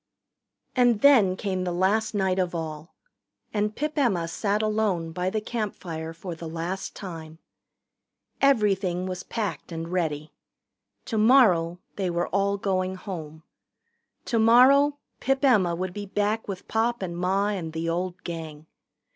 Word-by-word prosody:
And 245 -4 +3
then 230 -10 +6
came 185 -1 -2
the 180 - -2
last 205 +5 +1
night 190 -2 +1
of 180 -1 -1
all. 160 0 -6 0.6
And 210 0 0
Pip 300 +1 -2
Emma 190 -11 +1
sat 205 +4 -1
alone 210 -6 0
by 180 +2 -1
the 215 - -1
campfire 185 -8 -4
for 170 +2 -7
the 165 0 -7
last 170 +4 -4
time. 165 -4 -8 1.0
Everything 195 -9 +2
was 185 0 -4
packed 210 -4 -4
and 165 0 -5
ready. 155 -4 -2 0.7
Tomorrow 215 -8 +4 0.2
they 190 -3 -1
were 175 0 -1
all 200 +1 +1
going 185 -1 -1
home. 160 -5 -8 0.8
Tomorrow 255 +5 +5 0.2
Pip 270 +1 +1
Emma 195 -10 +4
would 185 +1 -4
be 205 0 -6
back 210 +3 -1
with 195 -2 -6
Pop 230 -1 0
and 170 -2 -4
Ma 190 +3 +1
and 180 -6 -3
the 165 +1 -3
old 180 +2 -2
Gang. 160 -3 -7
190 Hz, 140 wpm, -26 LUFS, 170-215 Hz, 1.0 s, then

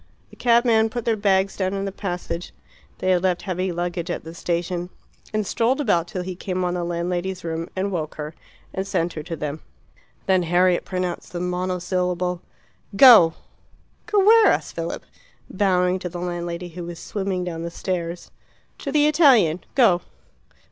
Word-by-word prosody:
The - - -14
cabman 235 -2 +3
put 240 0 -5
their 230 - +2
bags 195 -2 +1
down 190 0 -1
in 195 0 -2
the 195 - -3
passage 180 -3 -5 0.4
they 185 - 0
had 180 -1 +3
left 180 -1 0
heavy 185 -1 -2
luggage 175 0 -3
at - - -3
the 165 - -9
station 175 +1 -2 0.4
and 215 -1 -1
strolled 240 +7 +1
about 175 - +1
till 180 0 -4
he 185 0 -5
came 185 0 -3
on 175 0 0
the 175 -1 -2
landlady's 175 +2 -3
room 165 0 -4
and 195 +1 -1
woke 155 -4 -3
her, 150 +1 -6 0.4
and 190 +1 -3
sent 170 -3 -1
her 155 - -5
to 165 +2 -5
them. 150 0 -5 0.6
Then 190 -2 +3
Harriet 175 +1 +2
pronounced 180 -2 -4
the 175 - -3
monosyllable 180 0 -1 0.5
"Go!" 215 -9 +8 0.7
"Go 415 -3 +3
where?" 450 +1 +7
asked - - +1
Philip, - - -5 0.5
bowing 185 -2 +2
to 180 - -5
the 175 +1 -7
landlady, 175 0 -4
who 175 +1 -7
was 170 -1 -7
swimming 190 0 -3
down 170 -2 -4
the 170 - -4
stairs. 170 -1 -4 0.5
"To 280 - -4
the 295 0 +4
Italian. 265 - +4
Go." 210 -10 +5
180 Hz, 170 wpm, -23 LUFS, 175-195 Hz, 0.7 s, Go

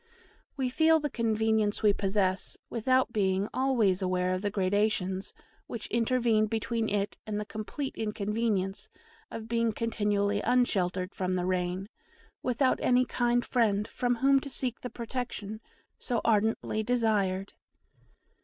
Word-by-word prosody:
We 265 -2 0
feel 320 +4 +4
the 295 -2 -3
convenience 220 -2 +1
we 210 -1 +5
possess, 195 -2 0
without 255 +1 +2
being 195 -1 +1
always 235 -8 +2
aware 185 0 0
of 185 - -2
the 205 - 0
gradations 195 -1 0 0.4
which 230 -3 -6
intervened 230 -2 +2
between 225 0 -1
it 200 0 -1
and 210 -1 -2
the 210 - -3
complete 215 +7 -5
inconvenience 210 -2 -2 0.4
of 225 -1 -7
being 230 0 +1
continually 205 -3 0
unsheltered 190 -7 +1
from 185 -1 -1
the 180 -1 -1
rain, 185 +1 -1 0.5
without 255 +1 +1
any 250 0 +4
kind 240 -1 +1
friend 210 -4 +1
from 245 -1 0
whom 275 +3 +4
to 280 - -8
seek 255 -3 -1
the 250 - -5
protection 230 -3 -5 0.4
so 240 -3 -1
ardently 220 0 +1
desired. 210 -5 0
215 Hz, 135 wpm, -29 LUFS, 200-240 Hz, 0.5 s, we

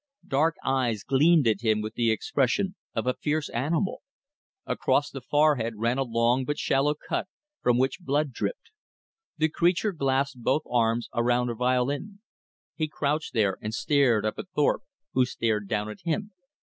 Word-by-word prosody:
Dark 155 +4 +2
eyes 125 -6 0
gleamed 150 +1 +4
at 110 - +2
him 110 -2 +2
with 110 +1 -4
the 115 -1 +1
expression 140 - 0 0.2
of 115 - -1
a 125 - +2
fierce 150 0 0
animal. 160 - -1 0.6
Across - - +1
the - - -7
forehead 145 -7 +2
ran 115 +4 0
a - - +2
long 120 +1 +1
but 145 +3 -2
shallow 145 +2 +1
cut 150 - -3 0.3
from 120 -1 +3
which 130 +5 +1
blood 145 -3 0
dripped. 485 - -4 0.7
The 160 - +3
creature 175 +6 +1
clasped 135 -3 0
both 155 +6 +1
arms 115 -1 +1
around 120 +1 +1
a - - -2
violin. 130 - -1 0.5
He 155 - -2
crouched 150 +1 -2
there 100 -4 +2
and 110 +1 -4
stared 130 -8 +2
up 110 - -2
at - - -7
Thorpe, 150 - +2 0.3
who 130 - +4
stared 110 -4 -1
down 105 +1 -1
at 105 - -8
him. 200 +5 -2
130 Hz, 165 wpm, -27 LUFS, 115-150 Hz, 0.7 s, gleamed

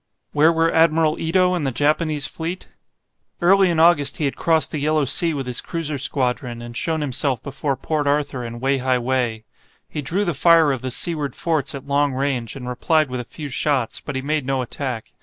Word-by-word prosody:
Where 155 +2 +4
were 165 0 +1
Admiral 160 -1 +3
Ito 180 +3 +2
and 175 -4 -1
the 135 - 0
Japanese 150 +2 +1
fleet? 170 +3 -5 0.6
Early 190 +1 +5
in 165 -2 0
August 160 -4 +4
he 155 - -1
had 140 - -1
crossed 160 -1 +2
the 155 - -2
Yellow 155 0 +1
Sea 160 +4 +2
with 135 -2 -3
his 125 -1 -2
cruiser 155 -4 -4
squadron, 125 -3 -2
and 120 0 -9
shown 160 +4 -1
himself 135 -2 0
before 140 0 -3
Port 150 -2 -2
Arthur 140 -3 0
and 120 0 -6
Wei 135 +2 +1
hai 130 0 +1
Wei. 120 -3 -1 0.4
He 150 - -5
drew 180 +9 -1
the 175 - 0
fire 165 +1 +5
of 130 -3 -3
the 130 - -3
seaward 145 0 -2
forts 155 -3 -1
at 140 0 -8
long 140 0 +1
range, 130 -3 -2
and 125 -2 -7
replied 155 +4 +1
with 125 - -3
a - - -4
few 145 +5 -8
shots, 135 -3 -1
but 145 - -6
he 130 - -3
made 150 +1 0
no 135 -1 0
attack. 125 -2 -4
145 Hz, 210 wpm, -21 LUFS, 130-160 Hz, 0.6 s, Early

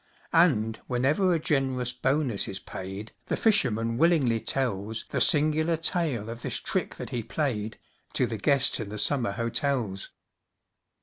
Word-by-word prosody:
And, 120 -11 +3
whenever 140 +10 +2
a 170 - +3
generous 130 -5 0
bonus 130 -3 0
is 95 - -4
paid, 95 +3 -7 0.2
The - - -1
fisherman 115 - +2
willingly 145 -9 +3
tells 110 -3 -2
The - - -2
singular 155 +1 +3
tale 155 - 0
of 115 +1 -7
this - - -2
trick - - -2
that - - -7
he 120 - -2
played, 115 -3 -2 0.4
To - - +2
the 110 - -4
guests 135 +6 +2
in 110 -3 -5
the 105 - -6
summer 120 -1 +1
hotels. 115 -3 -2
125 Hz, 145 wpm, -27 LUFS, 110-150 Hz, 0.4 s, And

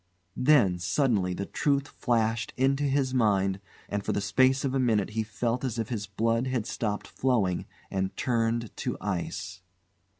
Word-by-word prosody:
Then, 125 -10 +4
suddenly, 100 - +1
the 100 - -3
truth 140 +3 0
flashed 115 -1 0
into 135 +2 +2
his 135 -2 +1
mind, 100 -5 +2 0.3
and 100 0 -2
for - - -1
the - - 0
space 130 +7 +3
of 135 - -1
a 135 - +1
minute 110 -5 +2
he 110 +1 -1
felt 115 +3 -2
as 125 -3 -2
if 115 - -2
his 105 -4 -3
blood 115 +5 0
had 125 -4 -1
stopped 105 -3 -2
flowing 110 -9 0 0.2
and 95 0 -2
turned 115 -3 0
to - - -3
ice. 95 -1 -4
115 Hz, 165 wpm, -28 LUFS, 100-130 Hz, 0.3 s, Then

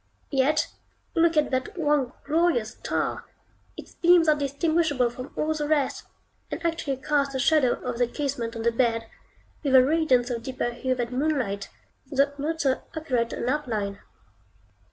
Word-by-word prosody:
Yet 280 +2 +2 0.5
look 330 -2 +3
at 300 - +2
that 260 +6 -2
one 295 -6 +1
glorious 300 -8 +2
star! - - -3 0.5
Its - - -10
beams 345 -1 +5
are 305 - +7
distinguishable 285 -2 +1
from 255 +2 -8
all 310 +1 0
the 300 -1 -2
rest, 295 -3 0 0.4
and - - -4
actually 325 -5 -1
cast 280 0 0
the 265 - -2
shadow 275 -2 +4
of 245 -2 -3
the 245 - +3
casement 245 -4 -3
on 225 - -4
the 235 - +3
bed, 230 -1 +1 0.6
with 275 -3 +2
a 255 -1 +8
radiance 265 -5 +2
of 235 -1 -2
deeper 255 0 -3
hue 255 +2 -1
than 250 +1 -2
moonlight, 255 -10 -1 0.4
though 280 0 +2
not 320 +3 -2
so 265 -2 +1
accurate 250 -7 -1
an - - -3
outline. 220 -8 -2
270 Hz, 160 wpm, -26 LUFS, 245-305 Hz, 0.6 s, a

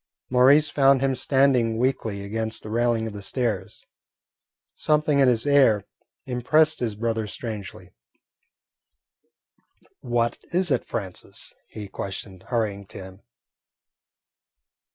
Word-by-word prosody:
Maurice 135 +5 +6
found 135 -2 +3
him 135 -1 +1
standing 130 -4 +2
weakly 115 -5 -1
against 110 +2 -3
the 110 - -8
railing 115 -1 +1
of 110 - -5
the 100 - -7
stairs. 105 -4 -3 0.9
Something 150 -1 +1
in 135 - +5
his 120 -1 +2
air 130 -8 +4 0.4
impressed 155 +6 +2
his 115 -4 -2
brother 110 0 -2
strangely. 105 -2 -7 2.1
"What 120 -1 -1
is 175 -1 +1
it, 130 - +1
Francis?" 95 -5 -6
he 105 -2 -8
questioned, 95 -1 -7
hurrying 105 -5 -2
to - - -11
him. 95 0 -11
115 Hz, 110 wpm, -24 LUFS, 105-135 Hz, 2.1 s, Maurice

